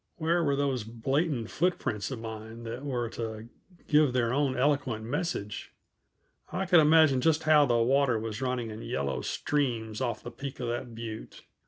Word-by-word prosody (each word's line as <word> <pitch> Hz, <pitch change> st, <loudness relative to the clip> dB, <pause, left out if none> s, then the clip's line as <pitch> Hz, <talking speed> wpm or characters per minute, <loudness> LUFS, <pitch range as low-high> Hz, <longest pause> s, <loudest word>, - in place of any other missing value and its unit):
Where 170 Hz, +2 st, +1 dB
were 140 Hz, -3 st, +2 dB
those 135 Hz, -4 st, 0 dB
blatant 120 Hz, +3 st, -1 dB
footprints 155 Hz, -, -1 dB
of 130 Hz, -, -4 dB
mine 110 Hz, +1 st, -8 dB
that 120 Hz, +3 st, -6 dB
were 125 Hz, -4 st, -2 dB
to 110 Hz, 0 st, -6 dB, 0.4 s
give 150 Hz, -4 st, +4 dB
their 120 Hz, -2 st, +1 dB
own 135 Hz, -2 st, +1 dB
eloquent 130 Hz, -5 st, +1 dB
message? 140 Hz, -, -3 dB, 0.8 s
I 190 Hz, +2 st, -1 dB
could 175 Hz, -2 st, +6 dB
imagine 155 Hz, -4 st, +5 dB
just 160 Hz, +1 st, +2 dB
how 150 Hz, -2 st, +5 dB
the 120 Hz, -1 st, +3 dB
water 130 Hz, +1 st, +3 dB
was 110 Hz, +2 st, -4 dB
running 125 Hz, -3 st, -2 dB
in 110 Hz, +1 st, -7 dB
yellow 70 Hz, -, -2 dB
streams 115 Hz, -, -1 dB
off 120 Hz, -2 st, -2 dB
the 120 Hz, -, -7 dB
peak 135 Hz, +1 st, -7 dB
of 120 Hz, -2 st, -2 dB
that 120 Hz, 0 st, -4 dB
butte. 110 Hz, -1 st, -7 dB
125 Hz, 170 wpm, -29 LUFS, 115-145 Hz, 0.8 s, could